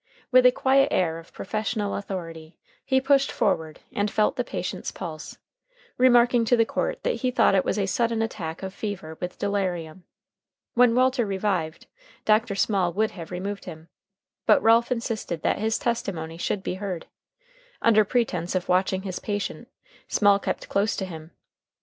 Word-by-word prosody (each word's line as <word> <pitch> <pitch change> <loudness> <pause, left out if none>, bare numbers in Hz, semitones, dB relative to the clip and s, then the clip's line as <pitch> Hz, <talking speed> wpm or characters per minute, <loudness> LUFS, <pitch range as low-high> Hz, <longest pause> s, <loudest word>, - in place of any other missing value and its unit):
With 255 0 +7
a - - +6
quiet 270 +2 +3
air 165 - 0
of 165 - -15
professional 215 0 -3
authority 165 -5 -6 0.3
he 265 -1 +2
pushed 275 +1 +3
forward 160 -6 -1
and 205 +1 0
felt 210 +1 +1
the 245 - -1
patient's 180 -4 -4
pulse, 160 -4 -7 0.6
remarking 245 -1 +5
to 245 +2 +3
the 230 - +4
court - - -2
that - - 0
he 255 - +1
thought 250 - +3
it 190 - +3
was - - -1
a 200 - +1
sudden 230 +3 0
attack 170 -6 -5
of 190 0 -5
fever 195 -7 -5
with 180 0 -5
delirium. 185 -4 -2 0.7
When 240 -1 +5
Walter 255 0 +3
revived, 190 -5 -2 0.4
Dr. 215 -1 +3
Small 195 -3 +1
would 215 +4 +1
have 165 -4 -9
removed 195 +3 -5
him, 160 -2 -10 0.6
but - - +5
Ralph 230 +2 +4
insisted 225 -8 -3
that - - +1
his 220 +1 0
testimony 170 -8 -3
should 195 +2 -2
be - - -2
heard. 185 -5 -4 0.7
Under 215 -2 +5
pretense 195 -6 -1
of 180 - -1
watching 185 +1 +1
his 190 -2 -4
patient, 205 0 -4 0.4
Small 205 -1 +4
kept - - -3
close 205 +3 +1
to 190 - -3
him. 160 -3 -9
200 Hz, 165 wpm, -25 LUFS, 180-230 Hz, 0.7 s, With